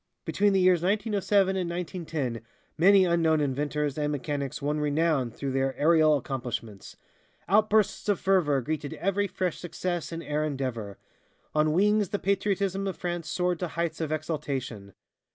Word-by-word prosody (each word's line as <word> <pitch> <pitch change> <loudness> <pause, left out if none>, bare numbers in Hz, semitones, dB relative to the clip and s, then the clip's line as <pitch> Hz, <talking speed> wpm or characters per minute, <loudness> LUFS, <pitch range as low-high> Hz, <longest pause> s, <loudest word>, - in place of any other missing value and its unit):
Between 205 0 +2
the 195 - +3
years 180 -2 +4
1907 200 0 +1
and 180 -2 -1
1910 160 - -4 0.3
many 190 +3 +6
unknown 165 -2 +2
inventors 145 +1 -1
and 150 0 0
mechanics 140 -1 -3
won 150 +1 -1
renown 150 -3 +1
through 135 +4 -5
their 135 0 -1
aerial 155 -1 +4
accomplishments. 120 -6 -6 0.5
Outbursts 215 +1 +2
of 200 - +2
fervor 170 -8 +2
greeted 150 +2 -4
every 200 +1 0
fresh 185 -2 -2
success 175 0 -4
in 165 0 -5
air 150 +1 -1
endeavor. 130 -9 -4 0.6
On 155 0 +2
wings 205 +3 +3
the 205 - -1
patriotism 195 0 0
of 190 - -4
France 175 -3 -4
soared 180 -1 0
to 180 - -2
heights 170 0 -3
of 155 -2 -2
exaltation. 135 - -4
160 Hz, 150 wpm, -27 LUFS, 145-185 Hz, 0.6 s, many